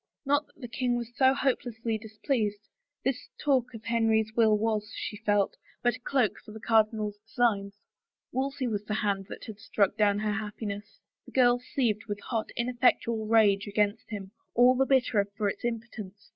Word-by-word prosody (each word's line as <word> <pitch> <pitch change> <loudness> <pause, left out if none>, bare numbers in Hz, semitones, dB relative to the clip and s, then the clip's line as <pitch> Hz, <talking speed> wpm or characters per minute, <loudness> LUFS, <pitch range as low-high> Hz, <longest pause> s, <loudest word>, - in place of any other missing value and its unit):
Not 290 +2 +2
that - - -27
the 245 - -6
king 240 +1 0
was 240 0 -6
so 265 -1 +5
hopelessly 235 -4 -1
displeased; 215 -1 -2 0.4
this 265 -1 -1
talk 255 -4 +1
of 220 - -9
Henry's 225 -2 +2
will 220 -2 +5
was, 210 -1 -1
she - - -4
felt, 205 -2 +1 0.3
but 240 0 +3
a - - -28
cloak 250 -3 +1
for 215 - -11
the 220 - -8
cardinal's 215 -2 +1
designs. 210 -2 0 0.6
Wolsey's 265 -1 -1
was 205 -1 -2
the 215 - -2
hand 200 -2 -1
that - - -8
had 215 -2 -9
struck 205 -3 +1
down 205 -1 +3
her 210 0 0
happiness. 210 -1 -5 0.3
The - - -13
girl 245 -1 +5
seethed 235 -4 -1
with 205 -1 -3
hot, 225 -3 -3
ineffectual 235 -2 +1
rage 210 -2 +4
against 205 +1 0
him, 200 -3 -6 0.2
all 245 +2 +7
the 265 +1 +2
bitterer 245 -6 +3
for 210 -2 +1
its 200 - -3
im 235 -1 0
potence. 210 -3 -11
220 Hz, 180 wpm, -29 LUFS, 210-245 Hz, 0.6 s, all